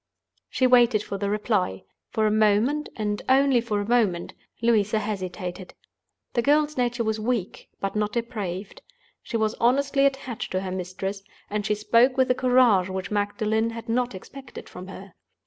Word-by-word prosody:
She 260 Hz, -, +1 dB
waited 240 Hz, -4 st, +5 dB
for 200 Hz, -, -5 dB
the 200 Hz, 0 st, -1 dB
reply. 205 Hz, -, -1 dB, 0.3 s
For 220 Hz, -2 st, 0 dB
a 215 Hz, -, +3 dB
moment, 215 Hz, +8 st, +2 dB
and 210 Hz, -1 st, -2 dB
only 265 Hz, -2 st, +4 dB
for 215 Hz, -3 st, -2 dB
a 205 Hz, -, -3 dB
moment, 215 Hz, -8 st, +1 dB, 0.3 s
Louisa 220 Hz, -2 st, +2 dB
hesitated. 185 Hz, -3 st, -5 dB, 0.6 s
The 240 Hz, -, +2 dB
girl's 295 Hz, +3 st, +2 dB
nature 240 Hz, -1 st, 0 dB
was 220 Hz, 0 st, -1 dB
weak, 220 Hz, -4 st, -3 dB
but 195 Hz, +1 st, -3 dB
not 210 Hz, 0 st, -1 dB
depraved. 210 Hz, -5 st, -4 dB, 0.4 s
She 230 Hz, -, -3 dB
was 220 Hz, -1 st, 0 dB
honestly 275 Hz, +3 st, +3 dB
attached 270 Hz, -4 st, -5 dB
to 185 Hz, -, 0 dB
her 190 Hz, -1 st, -4 dB
mistress; 190 Hz, +2 st, -4 dB, 0.3 s
and 210 Hz, 0 st, -1 dB
she 210 Hz, -, +1 dB
spoke 235 Hz, +5 st, +3 dB
with 260 Hz, -1 st, +3 dB
a -, -, +5 dB
courage 250 Hz, -7 st, +3 dB
which 190 Hz, 0 st, -5 dB
Magdalen 215 Hz, +2 st, 0 dB
had 230 Hz, 0 st, -8 dB
not 245 Hz, -1 st, 0 dB
expected 265 Hz, +7 st, -11 dB
from 180 Hz, +1 st, -10 dB
her. 190 Hz, -1 st, -10 dB
215 Hz, 165 wpm, -25 LUFS, 200-245 Hz, 0.6 s, waited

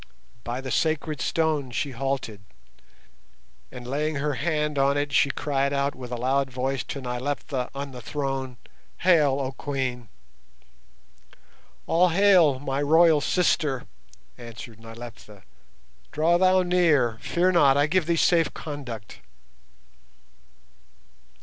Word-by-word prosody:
By 120 Hz, +2 st, -4 dB
the 130 Hz, -1 st, -6 dB
sacred 155 Hz, -3 st, -1 dB
stone 155 Hz, -5 st, 0 dB
she 135 Hz, +4 st, -3 dB
halted, 130 Hz, -5 st, -3 dB, 1.3 s
and 125 Hz, -1 st, -9 dB
laying 150 Hz, +4 st, -2 dB
her 145 Hz, +1 st, -1 dB
hand 150 Hz, -1 st, -1 dB
on 140 Hz, +1 st, +2 dB
it, 145 Hz, -1 st, -2 dB
she 145 Hz, -, +4 dB
cried 140 Hz, -1 st, -1 dB
out 140 Hz, 0 st, 0 dB
with 125 Hz, -2 st, -10 dB
a -, -, -2 dB
loud 135 Hz, +3 st, 0 dB
voice 130 Hz, +1 st, -2 dB
to 140 Hz, -, -6 dB
Nyleptha 125 Hz, +1 st, -3 dB
on 140 Hz, 0 st, -5 dB
the 125 Hz, -1 st, -9 dB
throne, 135 Hz, -1 st, -4 dB, 0.4 s
"Hail, 155 Hz, -7 st, +4 dB
oh 135 Hz, -1 st, -2 dB
Queen!" 130 Hz, -5 st, -4 dB, 1.8 s
"All 180 Hz, +2 st, +3 dB
hail, 175 Hz, -6 st, +4 dB
my 135 Hz, +1 st, -3 dB
royal 160 Hz, +1 st, +5 dB
sister!" 150 Hz, -6 st, +1 dB, 0.5 s
answered 115 Hz, -1 st, -10 dB
Nyleptha. 115 Hz, -3 st, -12 dB, 0.7 s
"Draw 165 Hz, +3 st, +2 dB
thou 185 Hz, 0 st, +4 dB
near. 155 Hz, -11 st, +2 dB
Fear 180 Hz, +2 st, +1 dB
not, 140 Hz, -6 st, +4 dB
I 145 Hz, -, +4 dB
give 175 Hz, +1 st, 0 dB
thee 170 Hz, -, +2 dB
safe 165 Hz, 0 st, +3 dB
conduct." 125 Hz, -9 st, -7 dB
140 Hz, 125 wpm, -25 LUFS, 130-155 Hz, 1.8 s, royal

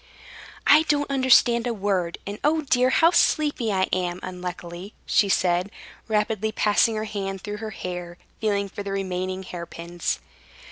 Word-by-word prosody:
"I 295 Hz, +2 st, +7 dB
don't 290 Hz, -1 st, +1 dB
understand 245 Hz, -3 st, +4 dB
a 235 Hz, -, -1 dB
word. 190 Hz, -4 st, -1 dB
And, 200 Hz, +1 st, -6 dB
oh 310 Hz, +2 st, +3 dB
dear! 255 Hz, -3 st, +2 dB
how 330 Hz, +5 st, +5 dB
sleepy 295 Hz, -9 st, +2 dB
I 190 Hz, -1 st, +1 dB
am, 180 Hz, -1 st, -1 dB
unluckily," 180 Hz, +1 st, -7 dB
she 205 Hz, -, +3 dB
said, 180 Hz, 0 st, +2 dB, 0.4 s
rapidly 220 Hz, 0 st, 0 dB
passing 215 Hz, +1 st, +2 dB
her 215 Hz, -, -2 dB
hand 195 Hz, -3 st, -4 dB
through 210 Hz, 0 st, -5 dB
her 220 Hz, 0 st, -5 dB
hair, 180 Hz, -3 st, -6 dB, 0.2 s
feeling 200 Hz, -2 st, 0 dB
for 200 Hz, -, -7 dB
the 200 Hz, -1 st, -5 dB
remaining 185 Hz, -1 st, -3 dB
hairpins. 170 Hz, -1 st, -5 dB
200 Hz, 150 wpm, -24 LUFS, 180-230 Hz, 0.4 s, I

